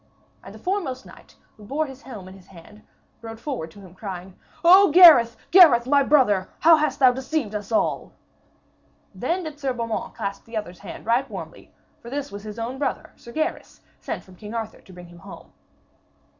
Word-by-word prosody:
And - - -12
the - - -10
foremost 350 -10 -3
knight, - - -17 0.2
who 215 - -15
bore 285 +9 -2
his 270 -2 -11
helm 210 -10 -10
in 185 - -11
his 190 -1 -17
hand, 195 +4 -16 0.4
rode 225 -1 -9
forward 235 - -5
to 200 +5 -16
him, 185 -2 -14
crying: 185 -2 -8 0.3
'O 380 +3 +7
Gareth, 295 -9 +8
Gareth, 310 -11 +7
my 280 +2 +3
brother, 245 -10 +2
how 325 0 +7
hast 300 -3 -1
thou 260 -2 +5
deceived 265 -2 -3
us 210 +1 -6
all!' 220 - -1 1.0
Then 360 +2 -2
did 305 -2 -8
Sir 270 -3 -2
Beaumains 230 -2 -4
clasp 200 -3 -5
the 230 -1 -7
other's 180 -4 -6
hand - - -10
right 240 +4 +1
warmly, - - -10 0.3
for 235 - -10
this 285 +2 -5
was 200 - -8
his 210 +1 -9
own 240 +4 -5
brother, 290 - -3
Sir 235 - -14
Gaheris, 315 +6 -4 0.2
sent - - -6
from 185 -1 -18
King 210 +4 -9
Arthur 220 -1 -6
to - - -18
bring 180 -1 -12
him 170 0 -15
home. - - -13
235 Hz, 195 wpm, -23 LUFS, 205-290 Hz, 1.0 s, Gareth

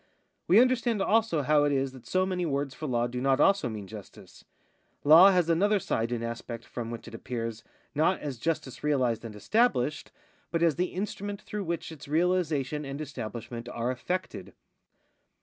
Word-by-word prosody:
We 190 +5 +7
understand 240 -3 +3
also 210 -6 +2
how 150 +2 +4
it 145 - +2
is 135 -1 0
that 130 -2 -14
so 185 0 +2
many 185 -1 -2
words 140 -3 -1
for 155 +4 -6
law 120 -2 +1
do 125 +1 -4
not 135 0 +2
also 195 -6 +3
mean 105 -3 -6
justice; 105 0 -12 0.6
law 165 +6 +9
has 180 -3 +3
another 200 +6 +3
side 115 - -1
and 120 -1 -2
aspect 115 0 -6
from 115 -2 -6
which 115 -1 -7
it - - -10
appears, 115 -1 -5 0.3
not 160 +6 +2
as 140 -5 -5
justice 135 -4 -3
realised 130 -7 +1
and 110 -2 -8
established, 150 - +1 0.4
but 165 0 0
as 165 -4 +3
the 180 - +1
instrument 205 +1 -4
through 210 -2 -5
which 170 0 -3
its 155 -4 -11
realisation 155 -3 0
and 140 0 -6
establishment 120 -4 -6
are 120 +1 -2
effected. 180 +9 -4
145 Hz, 175 wpm, -28 LUFS, 120-180 Hz, 0.6 s, law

